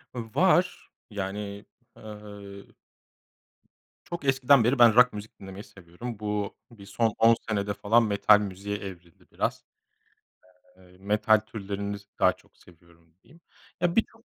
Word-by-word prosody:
Var. 175 Hz, -, +1 dB, 0.2 s
Yani, 100 Hz, 0 st, -5 dB, 0.3 s
eee 105 Hz, -2 st, -10 dB, 1.4 s
Çok 170 Hz, -4 st, -7 dB
eskiden 135 Hz, -1 st, +4 dB
beri 125 Hz, +3 st, +1 dB
ben 115 Hz, -2 st, +7 dB
rock 125 Hz, 0 st, +6 dB
müzik 105 Hz, +1 st, -9 dB
dinlemeyi 95 Hz, +1 st, -9 dB
seviyorum. 100 Hz, +6 st, -9 dB
Bu, 105 Hz, -1 st, -3 dB, 0.2 s
bir 100 Hz, -4 st, -14 dB
son 110 Hz, +2 st, 0 dB
10 115 Hz, 0 st, +6 dB
senede 100 Hz, -1 st, -1 dB
falan 115 Hz, +4 st, +3 dB
metal 105 Hz, 0 st, +4 dB
müziğe 100 Hz, 0 st, -4 dB
evrildi 90 Hz, -2 st, -11 dB
biraz. -, -, -2 dB, 1.1 s
Eee, 90 Hz, 0 st, -20 dB
metal 105 Hz, +2 st, +3 dB
türleriniz 100 Hz, -1 st, -6 dB
daha -, -, +4 dB
çok -, -, -27 dB
seviyorum 85 Hz, -1 st, -22 dB
diyeyim. 155 Hz, +8 st, -21 dB, 0.4 s
Ya, 175 Hz, 0 st, +1 dB
birçok 225 Hz, +1 st, -1 dB
105 Hz, 125 wpm, -27 LUFS, 100-115 Hz, 1.4 s, ben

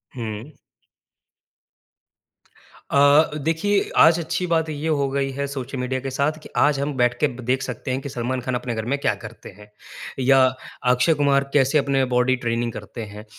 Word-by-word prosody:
हुँ। 115 Hz, +4 st, -6 dB, 2.3 s
अ, 145 Hz, +3 st, +5 dB
देखिए 195 Hz, +6 st, +1 dB
आज 165 Hz, +1 st, +6 dB
अच्छी 170 Hz, +2 st, -2 dB
बात 160 Hz, -1 st, +1 dB
ये 155 Hz, +1 st, -4 dB
हो 145 Hz, -3 st, +1 dB
गई 135 Hz, -1 st, -1 dB
है 140 Hz, -, -1 dB
सोशल 135 Hz, -1 st, -6 dB
मीडिया 130 Hz, +1 st, -2 dB
के 135 Hz, -, -4 dB
साथ 145 Hz, +4 st, 0 dB
कि -, -, -11 dB
आज 145 Hz, -1 st, +3 dB
हम 145 Hz, +1 st, -2 dB
बैठके 125 Hz, +4 st, +2 dB, 0.2 s
देख 130 Hz, +1 st, +1 dB
सकते 125 Hz, 0 st, -5 dB
हैं 130 Hz, -, -1 dB
कि 140 Hz, -, -6 dB
सलमान 125 Hz, 0 st, -3 dB
ख़ान 130 Hz, 0 st, -3 dB
अपने 120 Hz, -1 st, -3 dB
घर 110 Hz, 0 st, -4 dB
में -, -, +1 dB
क्या -, -, +1 dB
करते -, -, -10 dB
हैं। 105 Hz, 0 st, -15 dB, 0.5 s
या 135 Hz, +1 st, +4 dB, 0.5 s
अक्षय 125 Hz, +6 st, +3 dB
कुमार 140 Hz, -2 st, +1 dB
कैसे 140 Hz, +1 st, +3 dB
अपनी 140 Hz, -2 st, +1 dB
बॉडी 125 Hz, +1 st, +3 dB
ट्रेनिंग 120 Hz, -1 st, -2 dB
करते 120 Hz, -, -8 dB
हैं। 105 Hz, +1 st, -11 dB
135 Hz, 175 wpm, -22 LUFS, 125-145 Hz, 2.3 s, आज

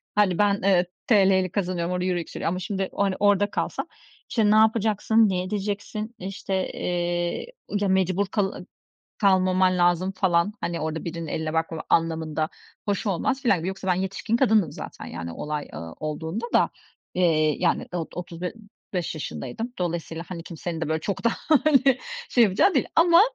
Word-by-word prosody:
Hani, 200 Hz, -4 st, +3 dB
ben, 200 Hz, -1 st, +2 dB
eee, 185 Hz, -2 st, +4 dB, 0.2 s
TL'yle 190 Hz, -4 st, +4 dB
kazanıyorum, 180 Hz, -3 st, -1 dB
orada 180 Hz, 0 st, -1 dB
euro 180 Hz, -1 st, +1 dB
yükseliyor 170 Hz, -1 st, -3 dB
ama, 180 Hz, +2 st, -2 dB
şimdi, 190 Hz, 0 st, -2 dB
hani, 195 Hz, -2 st, +2 dB
orada 205 Hz, 0 st, +3 dB
kalsam, -, -, -2 dB, 0.4 s
işte, 215 Hz, -3 st, +3 dB
ne -, -, +5 dB
yapacaksın, 220 Hz, 0 st, +4 dB
ne 180 Hz, -1 st, 0 dB
edeceksin? 210 Hz, +3 st, -4 dB
İşte, 190 Hz, 0 st, -3 dB
eee, 175 Hz, 0 st, -1 dB, 0.3 s
ı 205 Hz, -, +1 dB
ya, -, -, +2 dB
mecbur 190 Hz, +1 st, +2 dB
kal 195 Hz, -1 st, -2 dB, 0.5 s
kalmaman 185 Hz, -2 st, +3 dB
lazım 175 Hz, +2 st, +2 dB
falan. 185 Hz, 0 st, +2 dB
Hani, 170 Hz, -1 st, -2 dB
orada 160 Hz, +1 st, -3 dB
birinin 170 Hz, -1 st, -4 dB
eline 160 Hz, -1 st, -2 dB
bakmama 160 Hz, 0 st, -1 dB
anlamında. 160 Hz, -1 st, +1 dB, 0.4 s
Hoş 205 Hz, +1 st, -1 dB
olmaz 255 Hz, +8 st, 0 dB
filan 215 Hz, -8 st, +3 dB
gibi. 165 Hz, +3 st, -3 dB
Yoksa 190 Hz, 0 st, -5 dB
ben 180 Hz, -, +4 dB
yetişkin 190 Hz, +4 st, -1 dB
kadındım 220 Hz, -7 st, +3 dB
zaten -, -, -8 dB
yani 85 Hz, 0 st, -6 dB
olay, 150 Hz, -, -4 dB
ııı, 80 Hz, +1 st, -7 dB
olduğunda 160 Hz, +8 st, -3 dB
da. -, -, +4 dB, 0.4 s
Eee, 155 Hz, -4 st, +3 dB
yani 175 Hz, -2 st, +1 dB
o 165 Hz, -2 st, -2 dB
otuz 175 Hz, -1 st, -7 dB
b 180 Hz, -, -2 dB, 0.4 s
beş 175 Hz, -2 st, -1 dB
yaşındaydım. 150 Hz, -, -5 dB
Dolayısıyla, 170 Hz, -2 st, -3 dB
hani, 170 Hz, -3 st, -6 dB
kimsenin 170 Hz, 0 st, -5 dB
de, 160 Hz, -, -2 dB
böyle, 160 Hz, 0 st, 0 dB
çok 200 Hz, +7 st, -3 dB
da, 235 Hz, -, +5 dB, 0.2 s
hani, 275 Hz, -4 st, +4 dB, 0.3 s
şey 240 Hz, -, +6 dB
yapacağı 210 Hz, -, +3 dB
değil 265 Hz, -, +2 dB
ama 335 Hz, +1 st, +7 dB
185 Hz, 170 wpm, -25 LUFS, 170-205 Hz, 0.5 s, ama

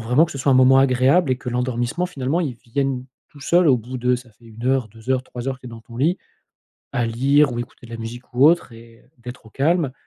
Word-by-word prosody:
vraiment 130 Hz, +7 st, +5 dB
que 155 Hz, -, -9 dB
ce 140 Hz, -, -7 dB
soit 135 Hz, +1 st, +1 dB
un -, -, +4 dB
moment 130 Hz, +1 st, +6 dB
agréable 135 Hz, +5 st, +3 dB
et 130 Hz, -, +2 dB
que 125 Hz, -, -7 dB
l'endormissement, 125 Hz, +7 st, -1 dB
finalement, 145 Hz, 0 st, -2 dB
il 145 Hz, -8 st, -2 dB
vienne 130 Hz, +1 st, -2 dB, 0.2 s
tout 145 Hz, -, -17 dB
seul 170 Hz, +3 st, +3 dB
au 130 Hz, -, +5 dB
bout 125 Hz, +3 st, -7 dB
de 125 Hz, +1 st, +1 dB
ça 125 Hz, -1 st, -13 dB
fait 115 Hz, +2 st, -21 dB
1 115 Hz, +1 st, -10 dB
heure, 130 Hz, -3 st, +1 dB
2 110 Hz, +4 st, -9 dB
heures, 130 Hz, -1 st, +2 dB
3 125 Hz, -1 st, -8 dB
heures 135 Hz, -, -3 dB
que -, -, -27 dB
tu -, -, -10 dB
es -, -, -8 dB
dans 115 Hz, -1 st, -10 dB
ton 115 Hz, +1 st, -13 dB
lit 160 Hz, +9 st, +1 dB, 0.7 s
à 120 Hz, -1 st, 0 dB
lire 135 Hz, +4 st, +3 dB
ou 120 Hz, -, -4 dB
écouter 120 Hz, 0 st, -10 dB
de -, -, -15 dB
la -, -, -4 dB
musique, 120 Hz, +2 st, -8 dB
ou 130 Hz, +3 st, +4 dB
autre 165 Hz, -6 st, +3 dB
et 115 Hz, 0 st, -15 dB, 0.2 s
d'être 125 Hz, -1 st, -10 dB
au -, -, -15 dB
calme 150 Hz, +2 st, +1 dB
125 Hz, 270 wpm, -21 LUFS, 120-140 Hz, 0.7 s, moment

